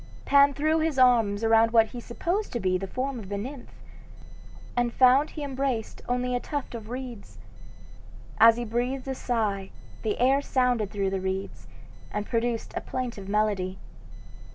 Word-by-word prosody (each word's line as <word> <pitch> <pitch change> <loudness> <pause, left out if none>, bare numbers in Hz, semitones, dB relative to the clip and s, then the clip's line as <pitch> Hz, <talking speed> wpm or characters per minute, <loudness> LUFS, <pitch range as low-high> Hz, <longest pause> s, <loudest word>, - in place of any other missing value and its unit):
Pan 280 0 +5
threw 310 +2 +2
his 315 -3 0
arms 230 -5 +4
around 225 0 +5
what 225 -1 +4
he 245 - -7
supposed 345 - -3
to 240 - -1
be 185 -3 +1
the 195 +1 -2
form 255 +4 -3
of 195 -4 -9
the 200 - -3
nymph, 255 +5 -7 1.1
and 245 -1 +1
found 260 +4 +5
he 300 - -7
embraced 265 -5 -3
only 250 0 0
a - - +1
tuft 285 0 -5
of 225 -2 -7
reeds! 245 -4 -7 1.0
As 230 0 +7
he 240 - -3
breathed 245 +4 -2
a 265 - -1
sigh, 210 -7 -2 0.3
the 215 -2 -1
air 265 +3 +4
sounded 250 -6 +1
through 195 -2 -1
the 195 -1 -2
reeds, 190 +1 -4 0.4
and 210 0 -3
produced 230 0 -2
a - - -2
plaintive 235 -6 -5
melody. 200 -3 0
240 Hz, 165 wpm, -27 LUFS, 210-260 Hz, 1.1 s, As